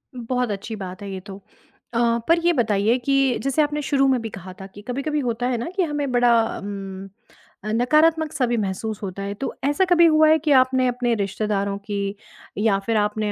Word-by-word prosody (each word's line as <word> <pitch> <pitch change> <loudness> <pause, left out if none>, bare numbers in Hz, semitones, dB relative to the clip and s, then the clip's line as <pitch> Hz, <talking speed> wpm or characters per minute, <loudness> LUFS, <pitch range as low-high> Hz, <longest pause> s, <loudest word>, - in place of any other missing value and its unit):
बहुत 245 -1 -2
अच्छी 205 +3 -5
बात 190 -1 -8
है 200 -1 -6
ये 190 - -5
तो 200 -1 -9 0.5
अ, 230 - 0 0.3
पर 335 +1 +4
ये 345 - +5
बताइए 220 -3 +2
कि 275 -2 +2
जैसे 275 +3 +1
आपने 295 0 0
शुरू 275 -1 +2
में 260 -2 +2
भी 225 - -5
कहा 190 -2 -9
था - - -7
कि 200 +1 -13
कभी-कभी 275 +4 -2
होता 245 -2 -1
है 250 -1 0
ना 230 - -4
कि 380 - +2
हमें 295 -4 -2
बड़ा 245 -1 +4 0.3
उम, 195 -1 -7 0.6
अ, 215 - -3
नकारात्मक-सा 305 +3 +2
भी 240 0 0
महसूस 200 +3 -4
होता 195 0 -5
है 200 0 -3
तो - - -3
ऐसा 290 +7 +2
कभी 350 -2 +5
हुआ 310 -1 +5
है 315 - +6
कि 305 0 -1
आपने 255 0 +2
अपने 245 -1 0
रिश्तेदारों 200 0 -2
की 200 -1 -2 0.4
या 205 -1 +2
फिर 230 -1 +1
आपने 210 0 0
240 Hz, 205 wpm, -22 LUFS, 205-275 Hz, 0.6 s, है